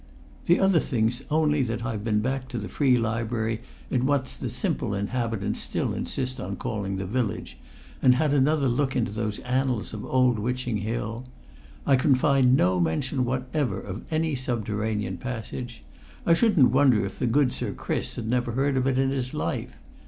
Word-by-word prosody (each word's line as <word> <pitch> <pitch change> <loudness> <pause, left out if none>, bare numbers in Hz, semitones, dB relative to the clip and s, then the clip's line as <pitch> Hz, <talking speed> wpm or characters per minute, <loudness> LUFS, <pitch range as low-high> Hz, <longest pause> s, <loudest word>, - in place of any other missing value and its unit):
The 175 - +4
other 195 -3 +4
thing's 120 -3 0
only 150 -1 +2
that 115 -2 -2
I've 110 -4 -3
been 105 -2 +1
back 130 +2 -2
to 125 - -5
the 105 -3 -4
Free 130 +5 +3
Library 115 0 -1 0.3
in 130 0 +1
what 140 -2 +2 0.2
the - - -2
simple - - -2
inhabitants 110 0 -2
still - - -1
insist 130 -1 -2
on 100 +2 -4
calling 100 -1 -3
the 95 0 -3
Village, 110 - -2 0.5
and 125 -1 +6
had 145 +2 +2
another 145 0 +3
look 130 +2 0
into 115 -4 0
those 105 -1 -2
annals 125 -3 -1
of 105 - -5
old 125 -3 +2
Witching 125 0 -1
Hill. 115 +3 -3 0.6
I 135 - +5
can 135 +1 +4
find 130 -1 +4
no 90 +1 +3
mention 125 - 0
whatever 130 -3 -1
of 100 +2 -6
any 160 0 +1
subterranean 110 -6 -2
passage. 120 +1 -6 0.4
I 170 - +5
shouldn't 175 - +4
wonder 130 -6 +4
if 95 - -7
good 135 0 +3
Sir - - -2
Chris - - -2
had 115 - -4
never 120 0 0
heard 135 +2 +1
of 130 0 +1
it 130 -1 +1
in 135 0 +2
his 130 -2 -3
life. - - -3
125 Hz, 175 wpm, -26 LUFS, 110-135 Hz, 0.6 s, and